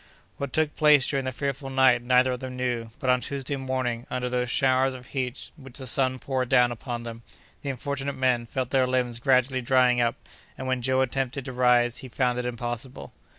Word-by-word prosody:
What 140 -2 -4
took 155 +1 0
place 150 -3 +5
during 135 -2 -1
that 130 -1 -3
fearful 140 0 -3
night 130 -2 +4
neither 125 +1 +3
of 125 - -3
them 130 0 -6
knew, 120 -3 -2
but, 130 - +1
on 125 0 +2
Tuesday 140 +1 -3
morning, 130 -3 -3
under 125 0 -2
those 125 0 -1
showers 130 0 +2
of 125 -1 -11
heat 130 -1 -4
which 135 -3 -11
the 130 - -6
sun 130 +1 +1
poured 130 -1 -2
down 120 -1 +4
upon 120 0 -5
them, 115 0 -8 0.4
the 140 - -4
unfortunate 140 +1 -3
men 125 -3 +1
felt 130 0 -3
their 130 -2 +3
limbs 125 -2 -1
gradually 130 0 +2
drying 125 0 +3
up, 120 +1 +1 0.4
and 130 - -6
when 130 -1 -1
Joe 130 +2 +2
attempted 130 0 -2
to 130 - -6
rise 125 -1 +3
he 130 - -9
found 125 0 0
it 125 - -3
impossible. 120 +1 -5
130 Hz, 205 wpm, -26 LUFS, 125-135 Hz, 0.4 s, place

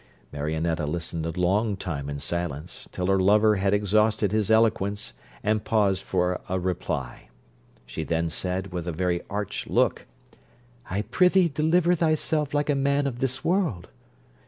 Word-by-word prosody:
Marionetta 80 +2 -1
listened 80 +1 -3
a 85 +2 -4
long 100 +3 +1
time 75 -7 -4
in 70 - -4
silence, 75 0 -4
till 90 - -3
her 95 +1 +3
lover 105 +2 +4
had 95 +1 +1
exhausted 105 0 +2
his 105 -2 +1
eloquence 110 -2 +2 0.3
and 105 0 +1
paused 100 -4 +2
for 90 -1 0
a 95 0 0
reply. 90 -8 -4 0.6
She 80 - -5
then 85 +1 0
said, 95 +2 -3
with 90 -1 -4
a - - -1
very 85 +1 -1
arch 105 0 -4
look, - - +1 0.8
'I 100 +3 -1
prithee 180 - +3
deliver 160 +4 +2
thyself 155 -3 +1
like 145 0 +1
a - - +2
man 140 +1 +1
of 125 -3 -3
this 130 +4 -1
world.' 165 - 0
100 Hz, 155 wpm, -26 LUFS, 85-115 Hz, 0.8 s, lover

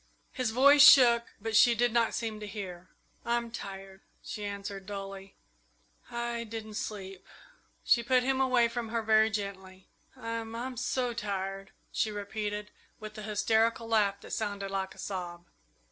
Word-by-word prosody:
His 255 -3 -1
voice 280 +5 +6
shook, 240 -4 +8
but 220 +1 -3
she 235 +3 +6
did 240 0 +1
not 235 -1 +2
seem 225 -2 -3
to 210 - -7
hear. 185 -4 -7 0.3
"I'm 235 0 -1
tired," 195 -3 -8 0.2
she 210 - -6
answered 200 -1 -6
dully; 195 -1 -7 0.7
"I 235 0 -3
I 235 - -3
didn't 220 -1 -7
sleep." 195 -3 -6 0.6
She 235 - +4
put 250 +1 +2
him 265 +1 +1
away 255 -3 +4
from 230 -1 -4
her 230 0 -1
very 220 0 +4
gently. 190 -3 -6 0.3
"I 230 0 -4
I'm 230 +3 -6
so 250 0 -1
tired," 195 -3 -4 0.2
she 220 - 0
repeated, 210 0 -4 0.3
with 215 0 -9
an 210 - -7
hysterical 225 +2 +1
laugh 205 -3 +2
that - - -12
sounded 200 -2 -3
like 190 -1 -3
a - - -20
sob. 175 -3 -6
215 Hz, 160 wpm, -30 LUFS, 195-235 Hz, 0.7 s, shook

